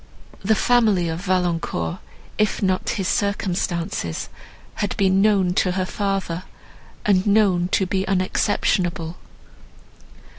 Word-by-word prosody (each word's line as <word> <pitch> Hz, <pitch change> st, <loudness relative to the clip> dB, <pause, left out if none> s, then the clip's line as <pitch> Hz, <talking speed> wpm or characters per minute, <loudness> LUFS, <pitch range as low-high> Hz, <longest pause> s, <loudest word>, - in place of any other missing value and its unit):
The 220 Hz, -, +3 dB
family 215 Hz, -7 st, +3 dB
of 160 Hz, +1 st, -3 dB
Valancourt, 175 Hz, -, -1 dB, 0.4 s
if 210 Hz, -1 st, +1 dB
not 185 Hz, -1 st, 0 dB
his 190 Hz, -2 st, -1 dB
circumstances, 175 Hz, -, -2 dB, 0.5 s
had 205 Hz, -, -2 dB
been 195 Hz, -1 st, +3 dB
known 195 Hz, -4 st, +3 dB
to 180 Hz, 0 st, +1 dB
her 185 Hz, 0 st, -1 dB
father, 195 Hz, -3 st, -2 dB, 0.6 s
and 195 Hz, -1 st, +3 dB
known 200 Hz, -4 st, +3 dB
to 190 Hz, -, +3 dB
be 190 Hz, +1 st, -1 dB
unexceptionable. 185 Hz, -3 st, 0 dB
185 Hz, 110 wpm, -22 LUFS, 175-200 Hz, 0.6 s, The